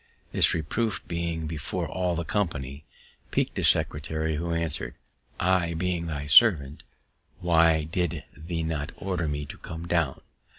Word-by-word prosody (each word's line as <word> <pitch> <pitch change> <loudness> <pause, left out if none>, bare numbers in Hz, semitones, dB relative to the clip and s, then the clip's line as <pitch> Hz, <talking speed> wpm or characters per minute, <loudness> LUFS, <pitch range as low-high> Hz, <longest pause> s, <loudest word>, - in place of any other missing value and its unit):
This - - +3
reproof, 100 +7 -2
being 85 -1 -2
before 75 -1 -3
all 90 -2 -1
the 85 0 -2
company, 75 -8 -2 0.4
piqu'd - - 0
the - - -2
secretary, 80 +1 +1
who 85 +2 -2
answer'd, 85 -1 0 0.4
_"I 85 -2 +2
being 85 0 -1
thy 75 -3 -3
servant, 75 - +5 0.6
why 80 -2 +4
did 85 +1 -2
thee 80 +2 -4
not 80 -1 -2
order 90 -4 -2
me 75 0 -2
to - - -10
come 85 +1 -7
down? 80 -6 +1
80 Hz, 140 wpm, -27 LUFS, 75-85 Hz, 0.6 s, servant